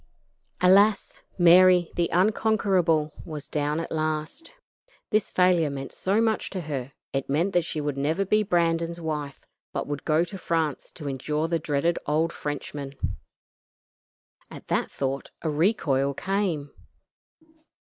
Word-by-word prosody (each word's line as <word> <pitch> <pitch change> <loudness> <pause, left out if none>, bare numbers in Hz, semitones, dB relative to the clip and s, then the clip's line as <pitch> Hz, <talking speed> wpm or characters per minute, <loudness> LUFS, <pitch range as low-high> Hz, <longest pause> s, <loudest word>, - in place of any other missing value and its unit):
Alas! 195 +3 +4 0.2
Mary, 180 0 +6
the 170 -1 +1
unconquerable, 185 -6 +2
was 155 -4 -7
down 150 +1 -1
at 165 - -5
last. 155 - -3 0.6
This 215 -2 +2
failure 180 -4 +3
meant 135 -1 -6
so 195 +3 0
much 225 -1 +1
to 190 - -4
her; 140 -4 -5 0.2
it 135 0 -2
meant 170 +8 +1
that 175 -2 +2
she 160 - -3
would 145 -2 -2
never 160 +8 0
be 215 +3 +3
Brandon's 170 -3 0
wife, 150 -4 -5 0.3
but - - -2
would 145 -1 -5
go 155 +1 +2
to 190 +2 -9
France 160 -5 -1
to 150 - -7
endure 150 +4 -2
the 165 0 0
dreaded 155 +3 0
old 160 +3 +1
Frenchman. 145 -1 -5 1.5
At - - -11
that - - 0
thought 135 0 -3
a 160 - 0
recoil 145 -5 +1
came. 185 -7 -1
165 Hz, 135 wpm, -26 LUFS, 145-185 Hz, 1.5 s, Mary